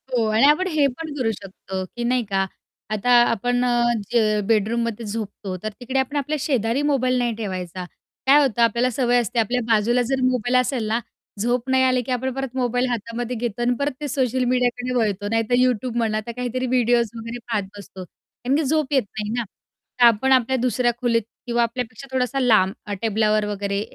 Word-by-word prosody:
हो 230 -2 +2
आणि 220 +5 +4
आपण 335 +6 +3
हे 310 -5 +2
पण 300 +4 -6
करू 230 -4 +1
शकतो, 190 -2 -7
की 240 +6 -7
नाही 245 0 +1
का. 195 -1 0 0.4
आता 215 +3 0 0.2
आपण 245 +3 0 0.5
जे 215 -3 +2
बेडरूममध्ये 230 +1 0
झोपतो. 205 -3 -5
तर 215 - -1
तिकडे 260 +2 -1
आपण 265 +2 -2
आपल्या 295 +2 -1
शेजारी 255 -2 0
मोबाईल 255 -2 +1
नाही 240 -2 0
ठेवायचा. 185 -4 -5 0.4
काय 285 +2 +7
होतं 245 -4 +1
आपल्याला 235 +2 +3
सवय 245 0 +2
असते 235 +1 -2
आपल्या 245 +3 +1
बाजूला 230 +2 +3
जर 270 -1 0
मोबाईल 250 -1 +1
असेल 250 -4 -2
ना, 225 +2 +1 0.4
झोप 240 +4 0
नाही 260 0 +3
आली, 255 -1 +3
की 255 - -6
आपण 255 +1 -1
परत 270 -1 -5
मोबाईल 245 0 +1
हातामध्ये 235 +1 -3
घेतो 235 0 -3
आणि 245 +1 +2
परत 285 +1 0
ते 295 - -2
सोशल 260 -2 0
मीडियाकडे 250 0 0
वळतो. 205 -4 0
नाहीतर 225 +1 +1
YouTube 250 -1 +1
म्हणा. 220 -2 +1
आता 215 +2 -4
काहीतरी 250 +1 -3
व्हिडिओज 240 -2 +2
वगैरे 230 +1 -6
पाहत 210 -3 +1
बसतो. 200 -2 -10
कारण 245 +8 -5
की 315 - +1
झोप 300 0 0
येत 265 - +3 0.2
नाही 210 0 -3
ना. 240 - 0 0.6
तर 245 - +7
आपण 235 +3 +4
आपल्या 260 0 +3
दुसऱ्या 250 -1 +1
खोलीत 230 -2 +2 0.3
किंवा 235 0 +2
आपल्यापेक्षा 235 +1 -5
थोडासा 260 +1 0
लांब 215 -7 +4
अ, 205 - -4
टेबलावर 215 -1 +1
वगैरे 200 -1 -2
240 Hz, 190 wpm, -22 LUFS, 220-255 Hz, 0.6 s, काय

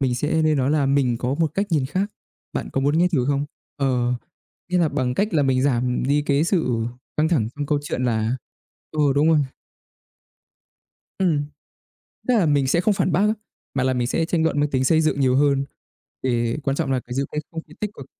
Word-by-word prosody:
mình 130 -2 +1
sẽ 150 +5 0
nên 155 -1 +3
nói 130 +1 +1
là 145 -2 +2
"Mình 135 -3 +2
có 125 +3 -1
một 160 +1 0
cách 200 +1 0
nhìn 145 -6 +1
khác. 190 +8 -1 0.4
Bạn - - -3
có 135 - 0
muốn 145 +3 +2
nghe 180 +1 +4
thử 130 -5 +2
không?" 140 0 +1 0.3
Ờ, 125 -3 +1 0.5
nghĩa 180 0 +1
là 170 -3 +3
bằng 130 -4 -1
cách 200 +9 +1
là 150 - +4
mình 130 -1 +2
giảm 125 -2 +1
đi 145 +3 +2
cái 145 +1 +2
sự 130 - +1 0.3
căng 155 +1 +2
thẳng 135 -11 +1
trong 145 0 -3
câu 145 0 +1
chuyện 135 -3 -3
là 115 +1 0 0.6
ừ, 155 - -4 0.2
đúng 145 +2 +4
rồi. 160 -2 +5 1.8
Ừm. 165 -7 +2 0.8
Tức 250 - +4
là 205 -7 +3
mình 145 -3 +2
sẽ 170 +6 +2
không 205 +3 +2
phản 185 - 0
bác - - +2
á, 210 +1 +3 0.4
mà 130 - +1
là 130 - +2
mình 125 -1 0
sẽ 165 +6 0
tranh 165 -1 0
luận 155 -3 +1
mang 145 0 +1
tính 130 -1 +1
xây 160 +4 +4
dựng 155 -3 +1
nhiều 130 -1 +3
hơn, 140 -1 +3 0.6
thì 120 -2 0
quan 135 -1 0
trọng 135 - 0
là 130 - +1
cái 125 0 -8
giữ 135 +1 0
cái 150 - -1
không 165 -1 -5
khí 155 - -14
tích 210 - -2
cực. 135 - -10
145 Hz, 230 wpm, -23 LUFS, 130-160 Hz, 1.8 s, rồi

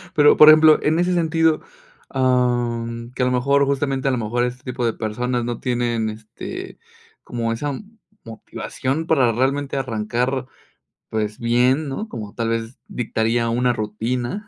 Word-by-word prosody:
Pero, 150 -1 +6
por 150 - +10
ejemplo, 155 0 +7
en 160 +2 +1
ese 180 +1 +1
sentido, 165 -2 +2 0.5
em, 120 -2 0
que 130 - -1
a - - +3
lo 125 - +1
mejor, 140 +3 +2
justamente, 135 -1 -1
a - - +3
lo 130 - 0
mejor 120 +2 -1
este 125 +1 -4
tipo 125 -2 -3
de 115 - +1
personas 120 +3 -2
no 120 -1 -4
tienen, 120 -3 -1
este, 110 0 -8 0.5
como 115 -1 -3
esa 145 +6 -2 0.5
motivación 130 +6 -4
para 135 -8 +3
realmente 135 +4 -1
arrancar, 125 +1 -1 0.6
pues 105 -1 -3
bien, 125 +5 +2
¿no? 175 +12 -4
Como 105 - -7
tal 115 -1 -2
vez 115 +2 -3
dictaría 115 0 -1
una 125 +2 +1
rutina 120 - -3
125 Hz, 155 wpm, -21 LUFS, 115-135 Hz, 0.6 s, por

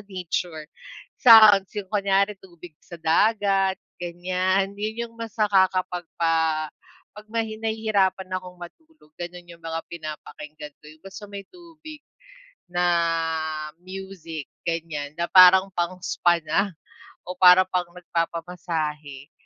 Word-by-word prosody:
nature. 175 -4 -4 0.6
Sa 220 -4 +10
agos 195 -1 -3
yung 195 - -5
kunyari 200 0 +1
tubig 175 -3 -14
sa 175 -2 -11
dagat, 195 +3 +2 0.2
ganyan. 185 +3 -1
'Yon 215 +2 -4
yung 230 - -21
mas 230 -1 -7
nakakapagpa 175 -5 +1 0.5
'pag 210 0 -12
mahi 225 -1 -3
nahihirapan 215 -4 0
akong 180 -1 -6
matulog 245 - -15
gano'n 175 0 -8
yung 170 -1 -15
mga 165 0 -4
pinapakinggan 150 -2 -9
ko, - - -25
yung 155 +4 -20
basta 195 +2 -10
may 200 -1 -8
tubig 320 -4 -13 0.7
na 175 0 0 1.0
music, 185 -5 -8 0.2
ganyan, 160 -3 -4
na 170 - 0
parang 190 +1 +7
pang 175 +1 -2
spa 175 -1 +2
na 195 +6 +1 0.6
o 180 - -5
parang 185 0 +7
pang 180 -1 -1
nagpapamasahe. 165 -4 -4
180 Hz, 120 wpm, -24 LUFS, 165-200 Hz, 1.0 s, Sa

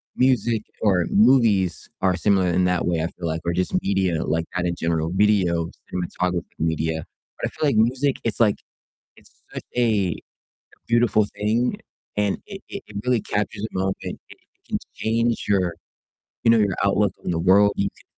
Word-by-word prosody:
Music 120 -4 +2 0.2
or 95 -5 +3
movies 105 -6 +3
are 95 -1 +3
similar 95 0 +2
in 90 +1 +2
that 90 -1 +1
way, 85 -2 +1
I 80 - 0
feel 85 - -8
like 80 +1 -2
or 85 - +1
just 90 - -1
media, 95 -4 0
like 80 +2 -1
at 90 - 0
a - - 0
general 80 -1 -1
video 95 -4 +2 0.2
cinematography 90 0 -2 0.2
media. 80 0 -1 0.4
But - - 0
I - - -6
feel 155 - -1
like - - 0
music 130 +5 +2
it's 115 -3 -2
like 110 -3 +4 0.6
it's - - -21 0.2
such - - -5
a 105 -7 +2 0.7
beautiful 115 -3 +3
thing 110 +4 +1 0.4
and 105 -1 +1
it 195 -1 -9
it 200 - -6
it 105 - -12
really 125 -3 +2
captures 105 0 -3
a 110 - -4
moment. 95 0 0
It - - -5
it - - -13 0.3
can - - -1 0.2
change 115 +1 0
your 95 -4 +1 0.7
you 115 - +4
know, 115 - +6
your 100 -3 +2
outlook 100 0 +2
on - - -2
the 85 - 0
world. 100 +4 +5
You 100 - +1
can - - -21
100 Hz, 180 wpm, -23 LUFS, 90-110 Hz, 0.7 s, know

